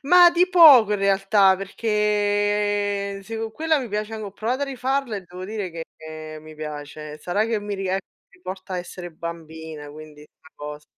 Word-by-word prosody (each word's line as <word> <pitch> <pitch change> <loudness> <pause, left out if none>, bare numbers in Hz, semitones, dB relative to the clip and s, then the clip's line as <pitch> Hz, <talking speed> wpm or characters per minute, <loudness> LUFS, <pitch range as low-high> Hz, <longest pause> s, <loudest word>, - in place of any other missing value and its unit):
Ma 350 +4 +7
di 355 +2 +3
poco 285 - +8
in 205 - +1
realtà, 195 0 +4
perché 205 -1 0
sì, 225 +2 -6
co' 225 0 -3
quella 315 +6 +1
mi 250 -4 -5
piace 210 +2 -3
anco 215 -2 -5
anche 195 - -10
ho - - -29
provato 250 +5 -1
a - - +3
rifarla 265 -3 -2
e - - -4
devo 180 +1 -9
dire 205 -3 -4
che 155 -1 -9
mi 155 0 -12
piace, 150 0 -7
sarà 190 +7 0
che 225 -1 0
mi 205 0 -4
rie 190 0 -1 0.3
mi - - -23
porta 185 0 -6
a - - -1
essere 175 0 -7
bambina, 160 -2 -8
quindi 155 0 -12
una 155 +1 -19
cos 150 0 -8
200 Hz, 190 wpm, -23 LUFS, 160-220 Hz, 0.3 s, poco